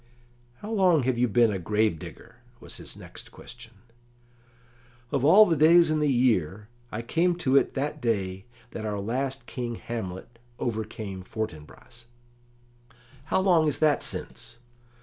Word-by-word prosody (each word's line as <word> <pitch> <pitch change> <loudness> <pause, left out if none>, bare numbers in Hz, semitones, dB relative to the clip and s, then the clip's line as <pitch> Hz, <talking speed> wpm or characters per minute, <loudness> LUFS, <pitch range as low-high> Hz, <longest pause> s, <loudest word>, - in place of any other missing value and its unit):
"How 210 - -7
long 185 - +3
have 125 -1 0
you 125 - +3
been 115 0 +3
a 95 - -3
grave 105 -1 0
digger?" - - -12 0.2
was - - -8
his - - -10
next - - -12
question. 120 -1 -13 1.4
"Of 140 -3 0
all 195 +9 +8
the 170 - +1
days 165 +2 +5
in 155 - +1
the 150 -2 +2
year, 105 - +1 0.2
I 115 +2 -4
came 170 +8 +1
to 140 -6 0
it 140 - +3
that 145 +2 -3
day 95 -5 -2 0.3
that 110 - -6
our 105 -2 -3
last 130 +6 -3
King 120 -2 -5
Hamlet 115 0 -7 0.2
overcame 110 -4 -4
Fortinbras." 110 +4 -8 1.2
"How 190 - +1
long 175 -5 +3
is 150 - +1
that 155 -2 +2
since?" - - -6
120 Hz, 150 wpm, -26 LUFS, 105-150 Hz, 1.4 s, all